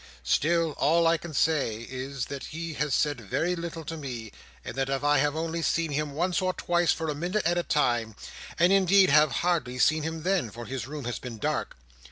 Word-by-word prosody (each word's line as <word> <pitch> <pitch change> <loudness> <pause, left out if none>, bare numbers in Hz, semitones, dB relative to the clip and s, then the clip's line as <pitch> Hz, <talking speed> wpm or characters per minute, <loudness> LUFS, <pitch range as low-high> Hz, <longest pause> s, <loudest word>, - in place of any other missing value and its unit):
Still, 165 - +2
all 165 +4 +3
I 165 0 +4
can 170 +1 -9
say 140 -8 +1
is, 130 0 -4
that 140 -1 -6
he 165 +1 -5
has 150 -1 0
said 145 -5 0
very 165 - -1
little 165 -2 -6
to 165 - -5
me; 125 -8 -6 0.3
and - - -5
that 135 0 -1
I 145 +1 +2
have 145 +1 +1
only 165 +1 -2
seen 165 -1 0
him 145 0 -2
once 175 +5 0
or 185 0 0
twice 175 -1 +1
for 160 - -2
a 150 - 0
minute 175 +7 -2
at 175 +1 +2
a - - +2
time, 120 -9 0 0.4
and 175 +3 +4
indeed 195 -2 +5
have 150 0 +5
hardly 160 -8 0
seen 155 +4 +3
him 160 0 -4
then, 185 - +1
for 120 +3 -8
his 130 -2 -5
room 145 -2 -6
has 120 - -3
been 120 -3 -7
dark. 105 - -2
155 Hz, 215 wpm, -27 LUFS, 135-170 Hz, 0.4 s, indeed